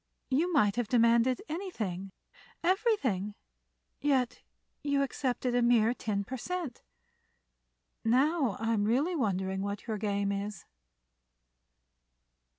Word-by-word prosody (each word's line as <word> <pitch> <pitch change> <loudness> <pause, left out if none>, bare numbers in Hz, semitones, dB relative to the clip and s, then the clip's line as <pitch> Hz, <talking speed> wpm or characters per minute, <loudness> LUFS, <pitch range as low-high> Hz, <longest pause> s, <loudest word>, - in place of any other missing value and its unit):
You 325 +7 +2
might 215 - +3
have 240 -3 0
demanded 235 +2 +3
anything—everything—yet 220 - -2 0.4
you 285 -1 +2
accepted 255 -2 -1
a 245 - +3
mere 235 -1 +4
ten 205 -4 -2
per 260 +6 -5
cent. 345 -1 -4 1.2
Now 265 - +2
I'm 225 -2 +1
really 280 +11 +2
wondering 190 - -1
what 200 0 -4
your 220 -3 -3
game 200 -1 0
is." 200 -2 -4
235 Hz, 95 wpm, -31 LUFS, 200-275 Hz, 1.2 s, mere